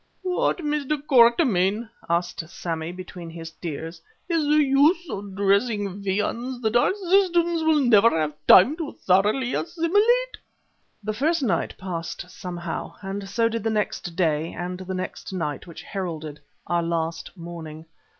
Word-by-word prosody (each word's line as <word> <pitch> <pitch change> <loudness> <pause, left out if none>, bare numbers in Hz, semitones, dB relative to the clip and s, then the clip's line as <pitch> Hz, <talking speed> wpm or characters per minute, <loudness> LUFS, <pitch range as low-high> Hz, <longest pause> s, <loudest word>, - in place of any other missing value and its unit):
"What, 365 -1 +1
Mr. 295 0 -1
Quatermain," 235 - +3 0.2
asked 170 -1 -1
Sammy 165 -1 -4
between 180 -1 -9
his 165 0 -8
tears, 165 0 -7 0.3
"is 330 -3 +1
the 295 - +2
use 295 +6 +3
of 195 -1 -6
dressing 200 0 +1
viands 230 +6 -2
that 220 -1 0
our 240 - +4
systems 350 -3 +2
will 315 -2 +3
never 230 -2 +6
have 155 -1 -1
time 240 +12 +8
to 320 -4 -5
thoroughly 210 +7 +2
assimilate?" 415 +10 +1 0.7
The 215 +1 -2
first 310 +7 +1
night 185 -9 0
passed 175 -1 -6
somehow, 175 -3 -6
and 195 0 -5
so 230 +3 +2
did 230 0 -2
the 225 - +1
next 210 -5 -2
day 160 -3 0
and 180 +2 -5
the 190 0 -5
next 185 +1 -5
night 155 -4 -3
which 170 - -10
heralded 160 -6 -5 0.3
our 175 0 +1
last 165 +2 -3
morning. 165 -2 -8
200 Hz, 145 wpm, -24 LUFS, 175-275 Hz, 0.7 s, time